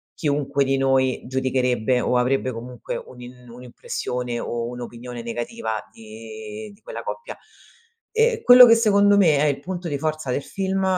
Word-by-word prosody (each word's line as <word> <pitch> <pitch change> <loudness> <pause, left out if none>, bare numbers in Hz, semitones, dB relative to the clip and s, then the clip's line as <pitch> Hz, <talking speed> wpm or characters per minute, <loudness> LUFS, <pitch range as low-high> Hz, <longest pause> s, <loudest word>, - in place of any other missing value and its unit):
chiunque 140 -3 0
di 135 0 0
noi 135 -1 +1
giudicherebbe 130 -2 0
o 125 - 0
avrebbe 130 +1 +1
comunque 120 +1 -7
un'im 125 0 -11
un'impressione 125 0 -5
o 115 0 -3
un'opinione 120 0 -8
negativa 115 - -4
di 110 - -10
di 200 - -23
quella - - -8
coppia 475 +1 -6 0.7
e 455 0 +2
quello 250 0 +10
che, 230 - +7
secondo 205 -3 +4
me, 170 -7 +4
è 140 - +2
il 140 -2 0
punto 175 +3 -6
di 145 -3 -3
forza 155 -3 -2
del 135 - -1
film 195 0 -2
130 Hz, 155 wpm, -22 LUFS, 120-170 Hz, 0.7 s, quello